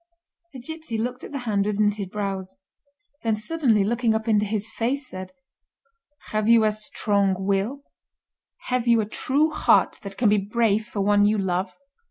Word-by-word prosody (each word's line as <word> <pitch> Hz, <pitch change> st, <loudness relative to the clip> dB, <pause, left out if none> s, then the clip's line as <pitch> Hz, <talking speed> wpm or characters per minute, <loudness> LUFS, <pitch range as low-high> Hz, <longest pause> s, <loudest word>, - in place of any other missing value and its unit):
The 260 Hz, -, -8 dB
gipsy 315 Hz, -2 st, -5 dB
looked 245 Hz, +3 st, -3 dB
at -, -, -8 dB
the 285 Hz, -, -3 dB
hand 205 Hz, -2 st, +1 dB
with 210 Hz, -1 st, -2 dB
knitted 205 Hz, -2 st, +1 dB
brows; 195 Hz, -2 st, -4 dB, 0.7 s
then 225 Hz, -2 st, +1 dB
suddenly 225 Hz, -2 st, +1 dB
looking 230 Hz, +1 st, +1 dB
up 220 Hz, +1 st, -3 dB
into 210 Hz, -2 st, +2 dB
his 210 Hz, 0 st, -2 dB
face, 255 Hz, +5 st, -2 dB
said: 185 Hz, -4 st, -8 dB, 1.0 s
"Have 215 Hz, 0 st, 0 dB
you 230 Hz, -1 st, +6 dB
a 215 Hz, -, +3 dB
strong 205 Hz, -2 st, 0 dB
will—have 230 Hz, +4 st, -5 dB
you 230 Hz, -1 st, +5 dB
a -, -, -2 dB
true 285 Hz, +8 st, +1 dB
heart 305 Hz, -, +3 dB
that 195 Hz, -1 st, -8 dB
can 240 Hz, -, +2 dB
be 210 Hz, 0 st, +4 dB
brave 215 Hz, +1 st, 0 dB
for 205 Hz, -, -3 dB
one 205 Hz, +1 st, +4 dB
you 215 Hz, +1 st, +2 dB
love?" 185 Hz, 0 st, -2 dB
215 Hz, 170 wpm, -24 LUFS, 200-235 Hz, 1.0 s, you